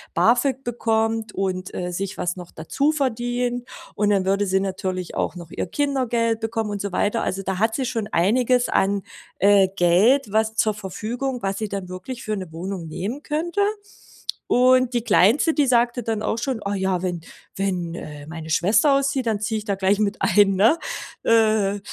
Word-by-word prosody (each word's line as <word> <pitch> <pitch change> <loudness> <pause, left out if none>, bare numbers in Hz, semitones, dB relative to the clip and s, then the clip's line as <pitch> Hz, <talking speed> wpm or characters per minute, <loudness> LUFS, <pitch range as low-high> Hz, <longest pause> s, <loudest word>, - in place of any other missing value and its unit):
BAföG 245 +8 +2
bekommt 225 -2 -1
und, 185 -1 -2
äh, 180 0 -3
sich 195 +3 -4
was 180 0 -2
noch 180 -2 -9
dazu 275 - 0
verdient. 245 -3 -1 0.3
Und 210 0 +1
dann 195 -2 +2
würde 200 +1 +1
sie 190 0 +2
natürlich 185 -2 -3
auch - - -2
noch 170 -2 -10
ihr - - -3
Kindergeld 240 -2 0
bekommen 225 -1 -2
und 205 -1 -3
so 200 - -3
weiter. 210 +5 0
Also, 195 +1 -2
da 190 -1 -2
hat 220 +1 +2
sie 265 - -1
schon 230 -4 -2
einiges 245 +6 +2
an, 200 0 +1 0.3
äh, 200 0 +5
Geld, 200 +7 +3
was 220 0 +1
zur 215 0 +2
Verfügung 210 +2 -6 0.3
was 195 0 -1
sie 215 -1 -3
dann 195 -2 -5
wirklich 210 +8 -7
für 215 - -2
'ne 185 -5 -6
Wohnung 175 +1 -5
nehmen 205 - -4
könnte. 325 +6 -2 0.9
Und 255 0 +4
die 240 - +1
Kleinste, 230 - +4
die 295 - +3
sagte 240 0 +2
dann 220 -1 -2
auch 220 - -1
schon: 250 0 -2
„Oh 200 - -2
ja, 190 -2 0
wenn 175 -2 -3 0.3
wenn 180 -4 -2
äh, 150 -3 -8
meine 160 0 -8
Schwester 215 - +4
auszieht, 275 -1 0
dann 215 -2 0
ziehe 215 +1 -1
ich 210 - -10
da 205 - 0
gleich 195 +1 +2
mit 205 0 0
ein“, 200 -2 +4
ne? 225 - +4 0.5
Äh, 215 -3 +3
210 Hz, 185 wpm, -23 LUFS, 190-240 Hz, 0.9 s, äh